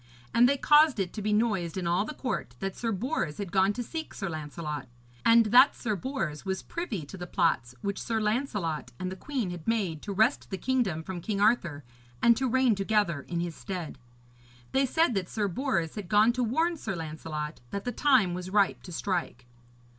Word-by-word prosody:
And 245 +1 +6
they 280 - +2
caused 300 -3 +5
it 185 -2 -1
to 215 - -5
be 210 +1 -1
noised 210 -6 +1
in 185 - -2
all 175 +4 +2
the 305 - -6
court 250 - -3
that 195 -1 -3
Sir 230 -1 -2
Bors 195 - -2
had 200 -4 -5
gone 190 0 +4
to 245 - -3
seek 320 +7 -6
Sir 195 -3 -3
Lancelot, 150 -2 -5 0.4
and 230 0 +6
that 255 +4 +7
Sir 215 -3 -2
Bors 190 - -3
was 190 -1 -3
privy 235 - -4
to 170 - -10
the 175 -1 -6
plots 130 -10 +1
which 200 0 -2
Sir 225 -2 -1
Lancelot 210 - -1
and 185 0 -3
the - - -5
queen 240 -2 -3
had 175 -3 -8
made 195 -9 0
to 205 - -5
wrest 220 +7 +2
the 190 - -3
kingdom 215 -10 0
from 180 0 -6
King 200 +3 -2
Arthur 180 -9 +2 0.4
and 235 0 +5
to 260 +1 0
reign 260 -1 +4
together 195 -6 +1
in 170 -1 -2
his 170 -1 -3
stead. 180 -9 -6 0.7
They 270 0 +2
said 320 0 +2
that 190 -4 -2
Sir 210 -2 -1
Bors 190 - -1
had 205 -5 -7
gone 215 +3 +5
to 250 0 0
warn 325 +9 +1
Sir 215 -9 -4
Lancelot 155 -2 -5
that 200 +7 -4
the 245 - -1
time 250 -11 +3
was 180 +1 -5
ripe 200 0 +2
to 180 - -10
strike. 175 -6 -3
200 Hz, 205 wpm, -28 LUFS, 170-240 Hz, 0.7 s, that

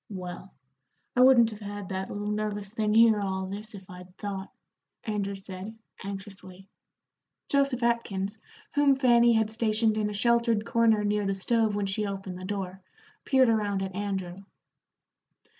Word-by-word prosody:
"Well, 185 -1 -7 0.6
I 250 - +4
wouldn't 245 -3 +6
have 210 - -9
had 205 -2 -7
that 190 0 -3
little 205 +1 -3
nervous 210 -1 -3
thing 215 -2 0
hear 225 -2 +6
all 190 -1 -2
this, 210 +3 -7
if 190 -2 -12
I'd 180 +1 -12
thought," 195 -2 -5 0.5
Andrew 200 -2 -2
said, 195 +3 -8 0.3
anxiously. 195 -1 -8 0.8
Joseph 275 -3 +1
Atkins, 220 -3 -1 0.3
whom 290 -1 +4
Fanny 240 -3 +5
had 220 -1 +1
stationed 220 -1 +1
in 210 -1 0
a - - -5
sheltered 235 0 +2
corner 230 -2 +3
near 205 -1 0
the 195 - 0
stove 220 +2 +1
when 205 -1 -1
she 200 +2 -1
opened 195 -2 -6
the 185 - -7
door, 190 -1 -4 0.4
peered 265 -1 +4
around 205 -3 +1
at 190 -1 -5
Andrew. 190 -2 -4
205 Hz, 155 wpm, -28 LUFS, 195-225 Hz, 0.8 s, wouldn't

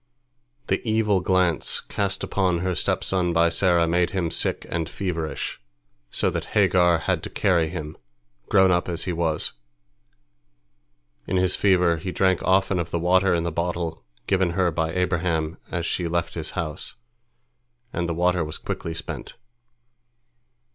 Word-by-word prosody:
The - - 0
evil 110 -3 +2
glance 90 -3 +2
cast 100 -1 -2
upon 90 -4 0
her 90 0 0
stepson 90 0 0
by 85 0 +4
Sarah 85 0 +3
made 85 +1 +2
him 85 -4 -1
sick - - 0
and 85 -1 -2
feverish, 85 -9 -4 0.5
so - - 0
that - - -3
Hagar 90 -3 +4
had - - -1
to - - -6
carry 85 -6 +2
him, 80 -2 -6 0.5
grown 95 -2 +5
up 90 0 +1
as 85 -1 -2
he 90 - -2
was. 80 -2 -1 1.7
In 95 - 0
his 90 0 +2
fever 90 -4 +3
he 90 +4 -4
drank 95 -1 +2
often 95 0 +2
of 85 -1 -3
the 85 - -1
water 90 +2 +3
in 85 - 0
the 85 - -1
bottle 85 0 -3 0.2
given 95 -3 +1
her 90 -1 +2
by 80 0 -1
Abraham 85 -2 -1
as 85 -2 -2
she 85 +1 -1
left 85 +1 -1
his 80 -2 -3
house, 80 -3 -4 1.0
and 85 -1 -1
the 85 - -1
water 90 0 +2
was 75 0 -5
quickly 80 - -5
spent. 85 - -6
85 Hz, 155 wpm, -24 LUFS, 85-95 Hz, 1.7 s, grown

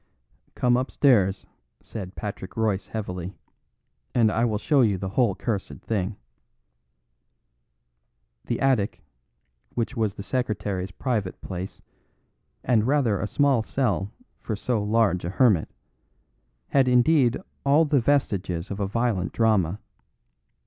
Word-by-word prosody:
"Come 125 0 +3
upstairs," 120 -7 +2 0.3
said 95 -4 -8
Patrick 100 -1 -6
Royce 105 -4 0
heavily, 90 -4 -5 0.8
"and 115 -3 +4
I 115 +2 +1
will 110 -3 0
show 140 +6 +3
you 105 -5 +3
the 95 +1 -4
whole 110 -1 +2
cursed 105 -5 -4
thing." 100 -2 -2 2.3
The 120 - -1
attic, 125 - +1 0.7
which 120 +3 -2
was 110 -4 0
the 100 - -7
secretary's 105 -6 -2
private 105 -2 -2
place 95 0 -7 0.8
(and 115 -3 +2
rather 130 -8 +2
a 105 - -2
small 135 +2 +2
cell 110 -5 -1 0.3
for 110 - -3
so 110 +1 -1
large 105 -4 +2
a 85 - -2
hermit), 105 -5 +3 1.0
had 135 -2 +3
indeed 125 0 +4 0.3
all 145 +4 +4
the 145 -3 +2
vestiges 100 -10 0
of 100 - -4
a 100 - 0
violent 105 -5 -1
drama. 105 -5 +2
110 Hz, 120 wpm, -25 LUFS, 95-125 Hz, 2.3 s, and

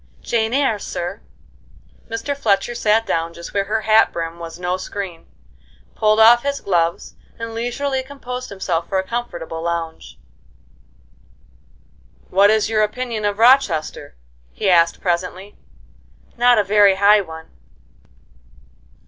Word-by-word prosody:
"'Jane 225 -1 0
Eyre,' 265 -5 +1
sir." 185 +1 -5 0.9
Mr. 230 +5 -3
Fletcher 230 -2 0
sat 225 -1 +1
down 165 -3 -2
just 170 - -9
where 200 -1 0
her 220 +2 -1
hat 220 +1 +4
brim 165 0 -5
was 165 0 -8
no 180 0 -2
screen, 185 -2 -7 0.7
pulled 215 0 +2
off 235 +2 +7
his 280 +1 -2
gloves, 170 -3 -1 0.2
and 230 0 -6
leisurely 260 +4 -2
composed 255 -2 -7
himself 180 -4 -3
for 195 - 0
a 190 0 -2
comfortable 170 -9 -5
lounge. 165 - -5 2.1
"What 200 +2 +5
is 215 0 +2
your 220 -1 +1
opinion 220 0 -2
of 205 -1 -1
Rochester?" 225 - +2 0.4
he 125 - 0
asked, 170 -1 +3
presently. 185 +2 -3 0.8
"Not 245 0 +4
a 210 - +3
very 200 0 +4
high 205 +2 +5
one." 160 -3 -11
205 Hz, 130 wpm, -20 LUFS, 175-230 Hz, 2.1 s, off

